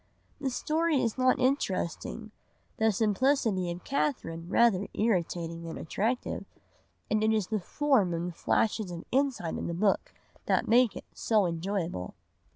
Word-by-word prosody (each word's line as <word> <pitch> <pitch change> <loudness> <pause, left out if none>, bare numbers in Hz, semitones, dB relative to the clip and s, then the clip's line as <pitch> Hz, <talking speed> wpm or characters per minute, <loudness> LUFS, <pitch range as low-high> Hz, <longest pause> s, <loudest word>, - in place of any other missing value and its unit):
The 275 -2 -1
story 310 +3 +1
is 230 -3 0
not 255 0 +4
interesting, 225 - -1 0.5
the 220 0 +3
simplicity 215 -2 +1
of 175 +1 -5
Catherine 170 - -2
rather 205 -3 +3
irritating 170 -6 0
than 165 -1 -6
attractive, 225 +9 -2 0.7
and 215 0 +2
it 220 - +3
is 215 -3 +1
the 215 -1 0
form 245 - +2
and 170 +1 -2
the - - -8
flashes 215 0 +1
of 175 -1 -6
insight 260 - 0
in - - -3
the 170 - -3
book 195 +3 +1 0.4
that - - +2
make 240 0 +4
it - - -8
so 215 -4 +2
enjoyable. 170 - -3
215 Hz, 150 wpm, -29 LUFS, 175-250 Hz, 0.7 s, not